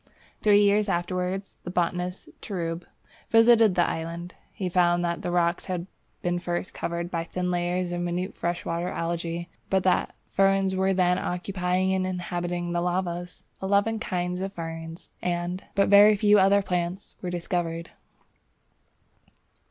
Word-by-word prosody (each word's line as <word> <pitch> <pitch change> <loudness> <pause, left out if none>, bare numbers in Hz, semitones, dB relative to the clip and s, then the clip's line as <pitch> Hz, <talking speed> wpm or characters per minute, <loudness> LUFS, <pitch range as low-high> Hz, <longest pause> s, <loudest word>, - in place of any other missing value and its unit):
Three 205 -1 +5
years 205 +1 +3
afterwards 185 +2 -2
the - - -6
botanist 180 +1 -2
Treub 170 -3 -4 0.4
visited 225 -3 +6
the 175 -1 +3
island. 170 +2 -4 0.2
He 190 - -4
found 175 -1 +3
that 170 0 -2
the - - -3
rocks 175 0 +1
had 180 -2 -2 0.4
been 175 0 0
first 175 +1 -3
covered 170 +1 -3
by 165 -1 -1
thin 180 +1 -3
layers 175 0 -1
of 175 0 -2
minute 175 +2 -2
freshwater 170 0 -2
Algæ, 170 0 -3 0.2
but 190 -1 +2
that 185 -1 +1 0.2
ferns 195 -1 +3
were 190 +1 +2
then 180 -1 +2
occupying 185 +1 -1
and 185 0 0
inhabiting 175 -1 -3
the 175 0 0
lavas. 175 0 -2 0.2
Eleven 200 +3 +2
kinds 180 -2 -2
of 195 +1 -3
ferns, 165 0 -7
and 175 +1 -2
but 200 0 +4
very 205 +1 +8
few 205 0 +5
other 195 +1 +4
plants, 180 +1 -2
were 180 - -3
discovered. 170 -1 -3
180 Hz, 145 wpm, -26 LUFS, 175-190 Hz, 0.4 s, very